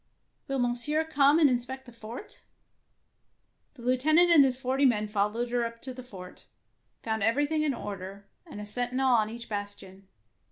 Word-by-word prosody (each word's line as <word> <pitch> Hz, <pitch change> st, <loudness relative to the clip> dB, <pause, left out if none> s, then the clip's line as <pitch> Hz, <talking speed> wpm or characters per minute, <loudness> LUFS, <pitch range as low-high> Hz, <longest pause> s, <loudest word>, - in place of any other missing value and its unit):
Will 275 Hz, -1 st, -2 dB
Monsieur 250 Hz, +6 st, +2 dB
come 290 Hz, -1 st, +3 dB
and 320 Hz, -3 st, +6 dB
inspect 260 Hz, +1 st, -3 dB
the 245 Hz, -, -13 dB
fortf' 230 Hz, -, -10 dB, 1.4 s
The 240 Hz, -, -13 dB
Lieutenant 310 Hz, +8 st, +4 dB
and 310 Hz, -4 st, +8 dB
his 260 Hz, -2 st, +1 dB
forty 265 Hz, +1 st, -1 dB
men 215 Hz, -5 st, +2 dB
followed 210 Hz, +3 st, -1 dB
her 245 Hz, -1 st, +1 dB
up 230 Hz, 0 st, -5 dB
to 260 Hz, -, -6 dB
the 255 Hz, -, -9 dB
fort, 185 Hz, -7 st, -12 dB, 0.6 s
found 220 Hz, -1 st, -2 dB
everything 290 Hz, +8 st, +1 dB
in 295 Hz, -4 st, 0 dB
order, 200 Hz, -2 st, -8 dB, 0.2 s
and -, -, -9 dB
a 210 Hz, -, -6 dB
sentinel 245 Hz, +4 st, 0 dB
on 215 Hz, -2 st, +2 dB
each 230 Hz, +1 st, -9 dB
bastion. 205 Hz, -2 st, -7 dB
245 Hz, 165 wpm, -28 LUFS, 215-270 Hz, 1.4 s, and